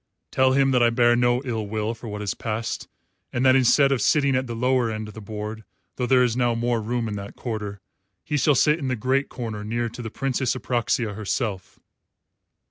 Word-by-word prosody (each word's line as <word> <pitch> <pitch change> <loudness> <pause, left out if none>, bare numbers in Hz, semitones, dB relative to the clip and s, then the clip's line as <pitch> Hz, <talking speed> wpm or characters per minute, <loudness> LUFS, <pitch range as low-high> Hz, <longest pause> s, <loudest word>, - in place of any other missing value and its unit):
Tell 130 0 +3
him 135 0 +3
that 125 -2 +3
I 120 - +5
bear 120 0 +4
no 120 +1 +2
ill 110 -4 -2
will 110 +2 -2
for 115 +1 -10
what 105 -1 -5
has 100 -3 -2
passed, 110 0 -4 0.4
and 120 +2 0
that 130 0 +6
instead 135 +2 +4
of 130 -4 +1
sitting 140 0 +3
at 130 0 0
the 115 - -5
lower 125 0 +1
end 110 -1 -4
of 105 - -10
the 110 - -9
board 105 +1 -6 0.3
though 125 - -1
there 130 -1 +5
is 120 -2 +1
now 120 -2 +1
more 120 0 0
room 115 +1 -2
in 105 - -4
that 100 0 -8
quarter 105 -4 -5 0.4
he 150 - -3
shall 145 0 +3
sit 150 +5 +3
in 140 - -3
the 130 - 0
great 130 +5 0
corner 110 -4 -5
near 115 +2 -2
to 120 - -9
the 115 - -5
Princess 130 0 -1
Apraxia 120 -3 -1
herself." 105 -2 -3
120 Hz, 215 wpm, -24 LUFS, 110-130 Hz, 0.4 s, that